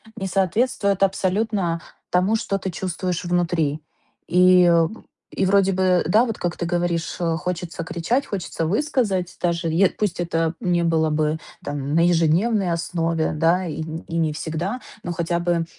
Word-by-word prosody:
не 195 Hz, -, -4 dB
соответствует 200 Hz, +1 st, +1 dB
абсолютно 190 Hz, -2 st, 0 dB, 0.3 s
тому, 185 Hz, +5 st, +3 dB
что 205 Hz, -3 st, -1 dB
ты 190 Hz, -, -3 dB
чувствуешь 180 Hz, 0 st, -3 dB
внутри. 170 Hz, -4 st, 0 dB, 0.5 s
И 180 Hz, +1 st, +6 dB
об 170 Hz, +4 st, +2 dB, 0.3 s
и 195 Hz, -, +1 dB
вроде 195 Hz, 0 st, +4 dB
бы, 185 Hz, -1 st, +2 dB
да, 215 Hz, +8 st, +4 dB
вот 225 Hz, -3 st, -4 dB
как 175 Hz, -1 st, -3 dB
ты 170 Hz, -, -2 dB
говоришь, 175 Hz, -1 st, -1 dB
э, 165 Hz, -2 st, 0 dB
хочется 175 Hz, -1 st, -4 dB
кричать, 205 Hz, +12 st, -1 dB
хочется 170 Hz, -4 st, -3 dB
высказать 205 Hz, -, 0 dB
даже, 170 Hz, -1 st, 0 dB
е 180 Hz, +4 st, +4 dB
пусть 200 Hz, -4 st, -2 dB
это 165 Hz, -1 st, 0 dB
не 175 Hz, -1 st, +1 dB
было 160 Hz, -1 st, +2 dB
бы 155 Hz, +1 st, 0 dB, 0.3 s
там 145 Hz, 0 st, -3 dB
на 170 Hz, +1 st, +4 dB
ежедневной 175 Hz, +4 st, +2 dB
основе, 165 Hz, -1 st, -1 dB
да, 170 Hz, +4 st, +2 dB
и 160 Hz, -1 st, -4 dB
нь 160 Hz, +1 st, -6 dB
и 165 Hz, -, -3 dB
не 160 Hz, -2 st, +1 dB
всегда. 170 Hz, +9 st, -3 dB, 0.2 s
Но 175 Hz, -, -4 dB
хотя 170 Hz, +1 st, -1 dB
бы, 170 Hz, -1 st, 0 dB
175 Hz, 165 wpm, -22 LUFS, 165-190 Hz, 0.5 s, И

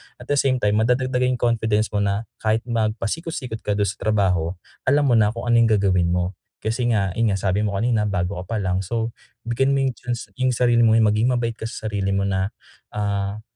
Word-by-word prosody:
at -, -, -13 dB
the 145 Hz, -, +3 dB
same 135 Hz, -1 st, +2 dB
time, 105 Hz, -4 st, +1 dB
madadagdagan 125 Hz, +2 st, +1 dB
yung 120 Hz, -, -10 dB
confidence 110 Hz, -2 st, +1 dB
mo 105 Hz, -, 0 dB
na 100 Hz, +1 st, 0 dB, 0.2 s
kahit 110 Hz, +1 st, 0 dB
magpasikot-sikot 115 Hz, -, -2 dB
ka 105 Hz, -, -2 dB
dun 100 Hz, -, +1 dB
sa 100 Hz, -1 st, -3 dB
trabaho, 95 Hz, -5 st, +1 dB, 0.3 s
alam 145 Hz, +2 st, +4 dB
mo 120 Hz, -5 st, +4 dB
na 105 Hz, 0 st, +3 dB
kung 115 Hz, -, -5 dB
ano -, -, +5 dB
yung 115 Hz, -, +5 dB
gagawin 95 Hz, -3 st, +2 dB
mo. 90 Hz, +1 st, 0 dB, 0.3 s
Kasi 120 Hz, +2 st, 0 dB
nga, 100 Hz, -3 st, +1 dB
yun 115 Hz, 0 st, +2 dB
nga, 95 Hz, -, 0 dB
sabi 95 Hz, 0 st, +1 dB
mo 100 Hz, -, -3 dB
kanina 110 Hz, +1 st, +1 dB
bago 90 Hz, -2 st, -2 dB
ka 115 Hz, -, -4 dB
palang. 95 Hz, -3 st, 0 dB
So, 115 Hz, +3 st, -2 dB, 0.3 s
bigyan 125 Hz, +4 st, +1 dB
mo 135 Hz, -, +1 dB
yung 130 Hz, -1 st, 0 dB
chance 120 Hz, -3 st, -5 dB
yung 130 Hz, 0 st, +2 dB
sarili 120 Hz, 0 st, +3 dB
mo, 110 Hz, 0 st, +5 dB
maging 110 Hz, +1 st, +3 dB
mabait 115 Hz, -2 st, -2 dB
ka 110 Hz, -, -4 dB
sa 110 Hz, -1 st, -5 dB
sarili 100 Hz, -2 st, -1 dB
mo 100 Hz, -, +1 dB
na, 95 Hz, 0 st, -1 dB, 0.4 s
ah, 100 Hz, 0 st, -2 dB
110 Hz, 215 wpm, -22 LUFS, 100-120 Hz, 0.4 s, ano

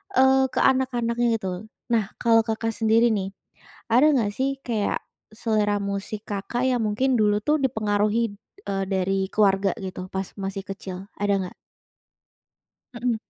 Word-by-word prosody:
eee, 265 Hz, +1 st, +5 dB
ke -, -, -1 dB
anak-anaknya 240 Hz, -3 st, +2 dB
gitu. 185 Hz, -1 st, -4 dB, 0.3 s
Nah, 220 Hz, -4 st, +1 dB
kalau 225 Hz, -1 st, +4 dB
Kakak 225 Hz, +1 st, -1 dB
sendiri 225 Hz, +1 st, +3 dB
nih, 195 Hz, -1 st, -2 dB, 0.6 s
ada 255 Hz, +7 st, +5 dB
enggak 235 Hz, -7 st, +2 dB
sih 270 Hz, +1 st, -1 dB
kayak 220 Hz, -4 st, -1 dB, 0.3 s
selera 215 Hz, -2 st, +1 dB
musik, 200 Hz, +1 st, -3 dB
Kakak 225 Hz, +5 st, -1 dB
yang 250 Hz, -2 st, +1 dB
mungkin 250 Hz, +5 st, +1 dB
dulu 210 Hz, -2 st, +3 dB
tuh 300 Hz, -, +3 dB
dipengaruhi, 215 Hz, -3 st, +1 dB, 0.3 s
eee, 195 Hz, -1 st, 0 dB
dari 190 Hz, 0 st, 0 dB
keluarga 195 Hz, -2 st, +3 dB
gitu 185 Hz, -1 st, -5 dB
pas 190 Hz, 0 st, -3 dB
masih 195 Hz, 0 st, -4 dB
kecil? 195 Hz, 0 st, -7 dB
Ada 205 Hz, 0 st, 0 dB
enggak? 185 Hz, -1 st, -5 dB, 1.4 s
Mhm. 240 Hz, 0 st, 0 dB
215 Hz, 140 wpm, -24 LUFS, 195-240 Hz, 1.4 s, eee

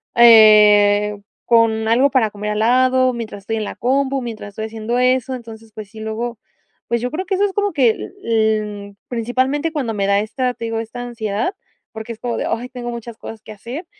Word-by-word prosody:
eh, 210 Hz, -3 st, +6 dB, 0.3 s
con 225 Hz, -1 st, +3 dB
algo 255 Hz, +5 st, +4 dB
para 230 Hz, -6 st, +1 dB
comer 210 Hz, +1 st, -4 dB
al 210 Hz, -, -2 dB
lado 255 Hz, +2 st, +3 dB
mientras 220 Hz, -4 st, -7 dB
estoy 225 Hz, +2 st, -3 dB
en 215 Hz, -, -2 dB
la -, -, -6 dB
compu, 270 Hz, +2 st, 0 dB
mientras 225 Hz, -3 st, -7 dB
estoy 220 Hz, +2 st, -6 dB
haciendo 220 Hz, +2 st, -3 dB
eso. 255 Hz, +1 st, +1 dB
Entonces, 225 Hz, -2 st, -11 dB
pues, 215 Hz, -2 st, -9 dB
sí, 220 Hz, -, -11 dB
luego, 220 Hz, +1 st, -4 dB, 0.5 s
pues, 235 Hz, 0 st, -1 dB
yo 250 Hz, -, -3 dB
creo 355 Hz, +6 st, -3 dB
que 385 Hz, -, 0 dB
eso 400 Hz, -, +1 dB
es 390 Hz, -, -3 dB
como 410 Hz, -1 st, 0 dB
que 260 Hz, -6 st, +4 dB
l -, -, -8 dB
l 215 Hz, -3 st, -1 dB
principalmente 260 Hz, +6 st, -1 dB
cuando 260 Hz, -8 st, -2 dB
me 200 Hz, -1 st, -1 dB
da 200 Hz, 0 st, +3 dB
esta, 250 Hz, +3 st, -2 dB
te 230 Hz, -, -6 dB
digo, 225 Hz, 0 st, -2 dB
esta 230 Hz, +2 st, -6 dB
ansiedad, 230 Hz, -, -3 dB, 0.4 s
porque 220 Hz, +1 st, -7 dB
es 220 Hz, -, -16 dB
como 240 Hz, -1 st, -3 dB
de: -, -, -2 dB
"Ay, 245 Hz, +2 st, -3 dB
tengo 245 Hz, -1 st, -6 dB
muchas 235 Hz, -1 st, -7 dB
cosas 220 Hz, -1 st, -9 dB
que 215 Hz, -, -11 dB
hacer", 240 Hz, -, -8 dB
230 Hz, 210 wpm, -19 LUFS, 215-250 Hz, 0.5 s, eh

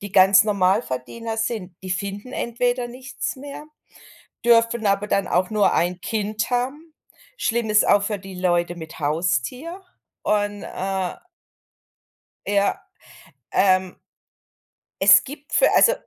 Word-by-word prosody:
die 200 Hz, -1 st, -8 dB
ganz 190 Hz, +1 st, +6 dB
Normalverdiener 205 Hz, -, -1 dB
sind, 220 Hz, -5 st, -3 dB
die 185 Hz, -, -7 dB
finden 200 Hz, +5 st, -4 dB
entweder 245 Hz, +1 st, -1 dB
nichts 255 Hz, +4 st, -6 dB
mehr, 285 Hz, +2 st, -9 dB, 0.8 s
dürfen 230 Hz, -1 st, +3 dB
aber 200 Hz, +1 st, +1 dB
dann 200 Hz, -1 st, 0 dB
auch 180 Hz, +1 st, +1 dB
nur 210 Hz, -2 st, +3 dB
ein 175 Hz, +1 st, 0 dB
Kind 215 Hz, +2 st, -2 dB
haben. 275 Hz, +6 st, -3 dB, 0.4 s
Schlimm 230 Hz, -1 st, -1 dB
ist 215 Hz, 0 st, +4 dB
auch 200 Hz, -, +4 dB
für 210 Hz, -1 st, -2 dB
die 190 Hz, 0 st, -10 dB
Leute 175 Hz, -1 st, 0 dB
mit 160 Hz, -1 st, -10 dB
Haustier 175 Hz, -, -2 dB, 0.4 s
und, 205 Hz, -1 st, 0 dB
äh 190 Hz, -1 st, -3 dB, 1.3 s
Ja, 200 Hz, 0 st, +1 dB, 0.7 s
ähm 185 Hz, -1 st, +2 dB, 1.1 s
es -, -, +7 dB
gibt 290 Hz, +2 st, -11 dB
für, -, -, +4 dB
also 475 Hz, -, +6 dB
205 Hz, 125 wpm, -22 LUFS, 185-235 Hz, 1.3 s, es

